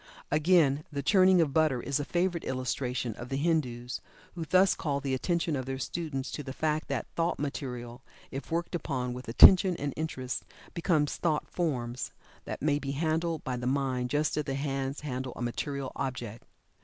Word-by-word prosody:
Again, 155 Hz, -2 st, +4 dB
the 140 Hz, -1 st, -3 dB
churning 185 Hz, +1 st, +6 dB
of 145 Hz, -4 st, +1 dB
butter 155 Hz, -5 st, +3 dB
is 140 Hz, +3 st, -1 dB
a -, -, -1 dB
favorite 175 Hz, +2 st, 0 dB
illustration 130 Hz, -2 st, -2 dB
of 120 Hz, -, -7 dB
the 135 Hz, -, -1 dB
Hindus, 125 Hz, -6 st, -1 dB, 0.3 s
who 170 Hz, -2 st, -4 dB
thus 185 Hz, +4 st, +5 dB
call 140 Hz, -3 st, -1 dB
the 135 Hz, -1 st, -2 dB
attention 165 Hz, +3 st, 0 dB
of 130 Hz, -1 st, -3 dB
their 135 Hz, 0 st, -2 dB
students 140 Hz, -1 st, -3 dB
to -, -, -4 dB
the 135 Hz, -2 st, -6 dB
fact 155 Hz, +1 st, -1 dB
that -, -, -2 dB
thought 170 Hz, +1 st, +1 dB
material 125 Hz, -4 st, -5 dB, 0.3 s
if 135 Hz, -, -6 dB
worked 170 Hz, +2 st, -2 dB
upon 130 Hz, -7 st, -2 dB
with 125 Hz, +1 st, -8 dB
attention 185 Hz, +9 st, +8 dB
and 140 Hz, -3 st, -3 dB
interest 130 Hz, -5 st, -3 dB, 0.3 s
become 165 Hz, -3 st, +2 dB
"thought 155 Hz, +1 st, -1 dB
forms" 125 Hz, -8 st, -2 dB, 0.3 s
that -, -, -5 dB
may 145 Hz, -1 st, +2 dB
be 140 Hz, -1 st, -3 dB
handled 160 Hz, +2 st, 0 dB
by 130 Hz, -1 st, -2 dB
the 125 Hz, 0 st, -3 dB
mind 130 Hz, -2 st, 0 dB
just 150 Hz, +2 st, +1 dB
as 150 Hz, -, 0 dB
the 135 Hz, -, -2 dB
hands 135 Hz, 0 st, -2 dB
handle 130 Hz, -3 st, -4 dB
a -, -, -7 dB
material 135 Hz, +3 st, -3 dB
object. 120 Hz, -4 st, -4 dB
140 Hz, 180 wpm, -30 LUFS, 130-160 Hz, 0.3 s, attention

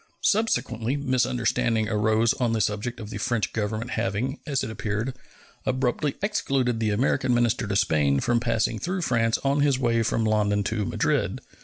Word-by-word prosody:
Subsequently 130 Hz, -, +1 dB
misunderstanding 120 Hz, -4 st, +1 dB
arose 110 Hz, +2 st, +2 dB
on 125 Hz, -4 st, 0 dB
the 115 Hz, -, 0 dB
subject 110 Hz, +3 st, -2 dB
of 110 Hz, -1 st, -8 dB
the -, -, -5 dB
French 115 Hz, -6 st, -1 dB
Government 110 Hz, +3 st, -2 dB
having, 115 Hz, +5 st, -2 dB
as 140 Hz, -3 st, 0 dB
it 110 Hz, -, -4 dB
appeared, 110 Hz, +4 st, -3 dB, 0.5 s
abruptly 130 Hz, +2 st, 0 dB
excluded 135 Hz, -, 0 dB
the 110 Hz, -1 st, +1 dB
American 125 Hz, +3 st, +1 dB
minister 120 Hz, -2 st, +1 dB
to 100 Hz, -, -2 dB
Spain 75 Hz, -8 st, +2 dB
from 120 Hz, -, +1 dB
passing 115 Hz, -2 st, 0 dB
through 180 Hz, 0 st, -2 dB
France 115 Hz, -5 st, +2 dB
on 140 Hz, +1 st, +2 dB
his 140 Hz, -2 st, +3 dB
way 115 Hz, -3 st, +1 dB
from 115 Hz, 0 st, 0 dB
London 105 Hz, -1 st, +2 dB
to 105 Hz, 0 st, -1 dB
Madrid. -, -, 0 dB
115 Hz, 165 wpm, -25 LUFS, 110-130 Hz, 0.5 s, his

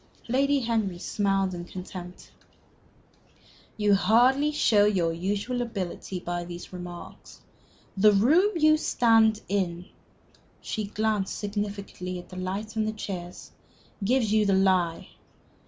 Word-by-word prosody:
Lady 275 Hz, +3 st, +2 dB
Henry 220 Hz, -6 st, -1 dB
smiled 195 Hz, 0 st, 0 dB
in 175 Hz, -1 st, -5 dB
contempt. 180 Hz, 0 st, -9 dB, 1.5 s
"You 210 Hz, -1 st, +3 dB
hardly 245 Hz, +9 st, +4 dB
show 215 Hz, -8 st, +4 dB
your 180 Hz, -5 st, +1 dB
usual 205 Hz, +8 st, -2 dB
ability 195 Hz, -5 st, -4 dB
by 175 Hz, 0 st, -4 dB
these 175 Hz, +1 st, -9 dB
remarks. 175 Hz, -1 st, -10 dB, 0.6 s
The 210 Hz, +2 st, +6 dB
room 290 Hz, -, +4 dB
you 310 Hz, -1 st, +5 dB
stand 225 Hz, -6 st, +3 dB
in" 180 Hz, -3 st, -1 dB, 0.7 s
she 215 Hz, -2 st, -4 dB
glanced 210 Hz, -1 st, -1 dB
significantly 200 Hz, -3 st, -4 dB
at 175 Hz, -, -10 dB
the -, -, -10 dB
lights 195 Hz, +4 st, -4 dB
and 215 Hz, -1 st, 0 dB
the 215 Hz, -, -2 dB
chairs 180 Hz, -4 st, -7 dB, 0.5 s
"gives 230 Hz, 0 st, +2 dB
you 215 Hz, -1 st, +4 dB
the 200 Hz, -2 st, +2 dB
lie. 185 Hz, -3 st, +1 dB
200 Hz, 125 wpm, -26 LUFS, 185-220 Hz, 1.5 s, The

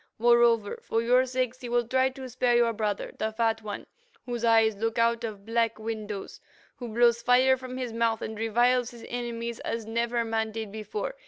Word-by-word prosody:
Moreover, 235 Hz, -2 st, +3 dB
for 225 Hz, -, -1 dB
your 250 Hz, +2 st, +4 dB
sakes 255 Hz, -1 st, -2 dB
he 245 Hz, -, -6 dB
will 240 Hz, -1 st, +1 dB
try 260 Hz, +1 st, +2 dB
to 265 Hz, 0 st, -9 dB
spare 245 Hz, 0 st, +1 dB
your 235 Hz, -1 st, +3 dB
brother, 210 Hz, -2 st, -2 dB
the 220 Hz, 0 st, -1 dB
Fat 225 Hz, 0 st, 0 dB
One, 210 Hz, -2 st, -6 dB, 0.4 s
whose 240 Hz, -2 st, -4 dB
eyes 225 Hz, -2 st, +4 dB
look 225 Hz, +3 st, -2 dB
out 235 Hz, 0 st, +2 dB
of 210 Hz, -3 st, -6 dB
black 230 Hz, 0 st, 0 dB
windows, 215 Hz, -2 st, -6 dB, 0.4 s
who 245 Hz, -, -6 dB
blows 235 Hz, +1 st, +3 dB
fire 255 Hz, +2 st, +5 dB
from 255 Hz, 0 st, -8 dB
his 250 Hz, -3 st, -4 dB
mouth, 230 Hz, -1 st, 0 dB
and 220 Hz, -, -5 dB
reviles 240 Hz, +3 st, +2 dB
his 235 Hz, -1 st, -12 dB
enemies 235 Hz, -1 st, -4 dB
as 230 Hz, -1 st, -4 dB
never 235 Hz, +1 st, -1 dB
man 220 Hz, -1 st, -1 dB
did 220 Hz, -2 st, -5 dB
before. 425 Hz, -, -4 dB
230 Hz, 190 wpm, -27 LUFS, 220-245 Hz, 0.4 s, fire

